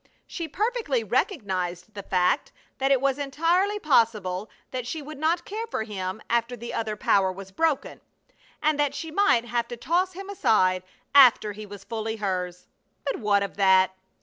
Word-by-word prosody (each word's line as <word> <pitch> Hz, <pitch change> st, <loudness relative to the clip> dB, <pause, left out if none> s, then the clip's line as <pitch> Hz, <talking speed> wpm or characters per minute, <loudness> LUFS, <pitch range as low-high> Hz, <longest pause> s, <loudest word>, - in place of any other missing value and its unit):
She 335 Hz, -2 st, -5 dB
perfectly 405 Hz, -, -1 dB
recognized 200 Hz, -, -2 dB
the 205 Hz, -, -6 dB
fact 180 Hz, -2 st, +1 dB, 0.3 s
that 270 Hz, 0 st, +2 dB
it 270 Hz, -, +5 dB
was 275 Hz, +1 st, 0 dB
entirely 335 Hz, +9 st, +1 dB
possible 225 Hz, -, +1 dB, 0.2 s
that 255 Hz, -2 st, -4 dB
she 315 Hz, +6 st, -3 dB
would 295 Hz, -1 st, -9 dB
not 335 Hz, +3 st, +1 dB
care 445 Hz, +3 st, -4 dB
for 220 Hz, -, -2 dB
him 195 Hz, -1 st, -5 dB
after 235 Hz, +1 st, 0 dB
the 235 Hz, +1 st, -7 dB
other 220 Hz, -2 st, -2 dB
power 195 Hz, -2 st, +2 dB
was 195 Hz, +1 st, -10 dB
broken, 320 Hz, +5 st, -1 dB, 0.6 s
and 305 Hz, -1 st, +2 dB
that 290 Hz, -1 st, +1 dB
she 325 Hz, +1 st, -5 dB
might 315 Hz, -10 st, +3 dB
have 235 Hz, 0 st, -1 dB
to 240 Hz, -, -7 dB
toss 360 Hz, +8 st, 0 dB
him 390 Hz, +2 st, -8 dB
aside 185 Hz, -, +2 dB, 0.3 s
after 250 Hz, -6 st, +7 dB
he 210 Hz, +1 st, -9 dB
was 200 Hz, -1 st, -10 dB
fully 220 Hz, +1 st, -4 dB
hers. 180 Hz, -4 st, -3 dB, 0.4 s
But 275 Hz, -, -1 dB
what 205 Hz, -2 st, +2 dB
of 200 Hz, -, -6 dB
that? 190 Hz, -1 st, +4 dB
235 Hz, 175 wpm, -26 LUFS, 200-310 Hz, 0.6 s, after